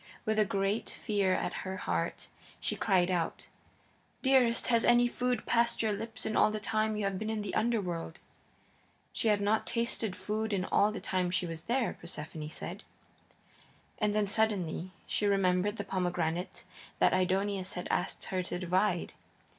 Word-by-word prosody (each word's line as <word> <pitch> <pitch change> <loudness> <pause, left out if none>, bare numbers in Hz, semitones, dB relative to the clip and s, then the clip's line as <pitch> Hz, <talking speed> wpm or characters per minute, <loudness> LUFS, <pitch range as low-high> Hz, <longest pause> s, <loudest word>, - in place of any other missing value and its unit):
With 215 0 +1
a 215 - +5
great 195 +3 0
fear 200 -4 +1
at - - -2
her 190 0 -4
heart 85 - -2 0.3
she - - -2
cried 185 -1 +2
out: 170 -2 -2 0.7
"Dearest, 255 -4 +4
has 235 -1 +4
any 240 0 +5
food 250 -1 -1
passed 235 0 +2
your 215 -1 +1
lips 225 +2 -5
in 220 - -1
all - - +5
the 215 0 -3
time 215 0 0
you 210 - -1
have 195 -1 -1
been 220 - -3
in 220 -1 -2
the 200 - -4
Underworld?" 190 -7 -1 0.9
She - - 0
had 210 -1 +4
not 210 +2 +1
tasted 230 -4 0
food 215 0 -2
in 185 -2 0
all 205 +2 +3
the 215 - -5
time 185 -1 0
she 180 0 0
was 165 -1 -6
there, 245 0 0
Persephone 155 -2 -6
said. 175 +5 -5 1.2
And 210 -1 +1
then, 210 -1 +3
suddenly, 195 -5 0 0.2
she 210 - 0
remembered 195 +1 +2
the 205 - -2
pomegranate 175 -3 -2 0.3
that - - +4
Aidoneus 190 +1 +1
had 180 - -4
asked - - -1
her 185 -1 -1
to 180 0 -4
divide. 185 +1 0
200 Hz, 170 wpm, -31 LUFS, 180-220 Hz, 1.2 s, a